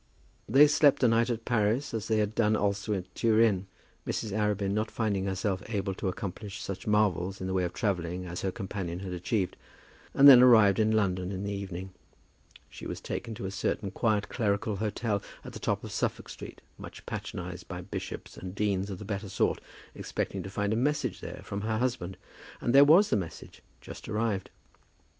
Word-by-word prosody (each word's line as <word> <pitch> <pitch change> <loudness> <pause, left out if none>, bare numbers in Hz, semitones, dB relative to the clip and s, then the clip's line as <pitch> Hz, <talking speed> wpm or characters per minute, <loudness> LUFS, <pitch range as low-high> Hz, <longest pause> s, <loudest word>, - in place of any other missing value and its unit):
They 135 +6 +8
slept 145 -2 +4
a - - +7
night 115 +1 +3
in 120 - 0
Paris, 115 +3 0
as 110 -1 -3
they 110 - +2
had 105 0 0
done 110 -1 +2
also 100 0 -1
at 95 -1 -6
Turin, 110 -4 +3 0.4
Mrs. 110 - -2
Arabin 105 -1 0
not 110 +2 0
finding 100 -4 -1
herself 95 0 -1
able 100 -3 -1
to 95 - -4
accomplish 100 +2 -5
such 95 +1 -6
marvels 100 -3 +1
in 95 - -4
the 95 - -2
way 95 -1 +1
of 90 - -4
travelling 90 -3 -2
as 90 0 -5
her 95 - -1
companion 95 -2 -5
had 95 -2 -5
achieved 90 +2 -1 0.6
and 140 - +8
then 130 -3 +11
arrived 110 -5 +7
in 110 0 +3
London 95 -4 +1
in 95 0 -4
the 100 0 -2
evening. 95 -1 -6 0.8
She - - -9
was - - -5
taken 115 -2 -5
to 105 - -6
a 95 - -3
certain 100 0 -2
quiet 105 0 +1
clerical 105 -2 -1
hotel 105 0 -1 0.2
at - - -8
the - - -7
top - - -1
of - - -7
Suffolk - - -2
Street, - - -9 0.2
much - - -10
patronized - - -6
by - - -6
bishops - - -7
and 90 +1 -7
deans 100 -1 0
of 95 - -5
the 105 - -9
better 100 0 -4
sort, 100 - 0 0.3
expecting - - -3
to 95 - -7
find 100 +1 -1
a - - +1
message 130 -2 0
there - - -7
from 100 +1 -4
her 110 +1 -1
husband. 115 -7 -2 0.4
And 120 - 0
there 140 +1 +9
was 170 +8 +6
the - - +4
message 90 -5 -7 0.2
just - - -10
arrived. 105 -3 -1
105 Hz, 195 wpm, -29 LUFS, 95-110 Hz, 0.8 s, then